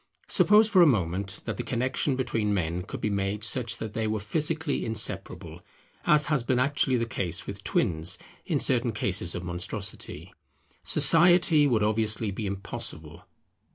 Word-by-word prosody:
Suppose 210 +1 +4
for 200 -4 +4
a 170 - +7
moment 95 - -1
that - - -4
the 120 - -3
connexion 130 +3 -1
between 110 -5 -1
men 85 -1 -2
could 90 - -8
be 105 - -1
made 100 +1 -2
such 115 0 -1
that 110 -2 -6
they 110 -1 -2
were 110 0 -1
physically 155 +7 -1
inseparable, 110 -2 0 0.5
as 150 -1 +5
has 150 -4 0
been 125 +2 0
actually 135 0 +1
the 115 -1 0
case 90 -6 -3
with 100 0 -8
twins 80 -1 0 0.3
in - - -1
certain 120 -2 +1
cases 90 -4 -2
of 90 - -5
monstrosity; 90 +4 -5 0.5
society 165 -3 +5
would 115 -5 +1
obviously 110 0 0
be 105 +2 -4
impossible. 100 0 -6
110 Hz, 155 wpm, -27 LUFS, 100-135 Hz, 0.5 s, a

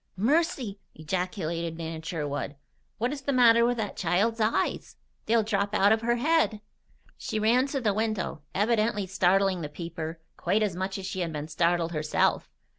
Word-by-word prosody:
"Mercy!" 255 - +1 0.2
ejaculated 170 0 -3
Nan 165 -1 -5
Sherwood. 150 -3 -4 0.4
"What 245 +5 -1
is 285 - -6
the 280 - -1
matter 235 -3 +6
with 240 +1 +2
that 215 -3 -3
child's 200 +7 +1
eyes? 215 +1 0 0.3
They'll 225 0 +3
drop 200 -1 -1
out 200 0 +5
of 220 0 +3
her 235 +1 +1
head!" 290 -4 +2 0.6
She - - -3
ran 240 +5 +3
to 275 0 -2
the 210 -4 +2
window, 215 -6 -2
evidently 215 0 +1
startling 190 0 +2
the 150 - -4
peeper 165 0 -6 0.2
quite 215 +1 +1
as 200 -5 -1
much 190 +2 -3
as 195 - -6
she 190 0 -4
had 170 -2 -1
been 150 -1 -5
startled 170 +1 +1
herself. 155 -2 0
200 Hz, 170 wpm, -27 LUFS, 170-230 Hz, 0.6 s, matter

